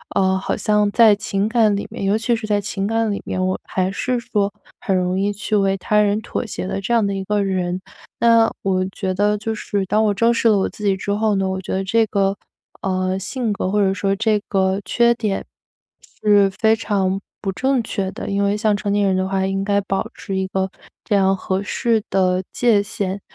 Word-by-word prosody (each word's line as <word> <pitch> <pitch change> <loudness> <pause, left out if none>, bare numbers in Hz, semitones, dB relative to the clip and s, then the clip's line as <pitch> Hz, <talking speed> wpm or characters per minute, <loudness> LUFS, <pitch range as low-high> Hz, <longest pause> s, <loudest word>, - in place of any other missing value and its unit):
呃， 190 0 +3
好 - - -2
像 210 -1 +2
在 220 -2 +6
情 200 0 -1
感 225 -3 +3
里 200 - -4
面 - - -6
尤 200 +2 +2
其 235 +1 +1
是 225 -1 -5
在 205 -1 +2
情 200 0 -3
感 225 -1 0
里 200 - -3
面， 185 0 -1
我 185 - -1
还 185 0 -1
是 250 +4 -1
说 205 -3 -1 0.3
很 190 - 0
容 180 +1 0
易 200 +1 +1
去 210 +1 -2
为 195 -1 +2
他 210 +3 +2
人 205 +1 +2
妥 240 - -4
协 195 - -5
的 195 - -3
这 235 +5 -1
样 225 -3 +3
的 200 - -1
一 195 0 -3
个 205 +1 0
人。 185 -2 -1 0.4
那 230 -1 +5
我 185 -1 +1
觉 190 -2 -3
得 205 +2 +1
就 220 +2 -3
是 200 -2 -2
当 215 +4 +2
我 205 - +2
正 230 +3 +3
视 230 - +1
了 210 - +4
我 - - +1
自 210 - -11
己 195 -2 +2
之 200 - -3
后 210 0 +1
呢， 190 -1 0
我 190 0 -3
觉 - - -7
得 190 - 0
这 225 +3 +2
个， 195 0 +1 0.5
呃， 185 0 -1
性 225 +2 -2
格 185 - -2
或 210 - +1
者 190 -1 +2
说 195 +1 0
这 215 0 +1
个 190 0 +1
缺 235 0 +3
点 215 -4 -2 0.8
是 205 -2 +5
非 220 +3 +2
常 195 -3 -1 0.2
不 195 - -2
正 265 +4 +1
确 195 -3 -3
的， - - -6
因 200 0 0
为 200 +1 +1
像 210 -1 +2
成 200 -1 -2
年 205 -1 +2
人 190 - +2
的 185 0 0
话 190 0 0
应 195 0 -1
该 200 0 +2
保 195 0 -2
持 195 - -6
一 190 - 0
个 190 0 -1 0.4
这 210 - +1
样 195 -1 +3
合 190 +2 -2
适 225 0 0
的 185 -1 +1
界 225 -4 +3
限， 200 -1 -4
200 Hz, 245 characters per minute, -20 LUFS, 190-215 Hz, 0.8 s, 在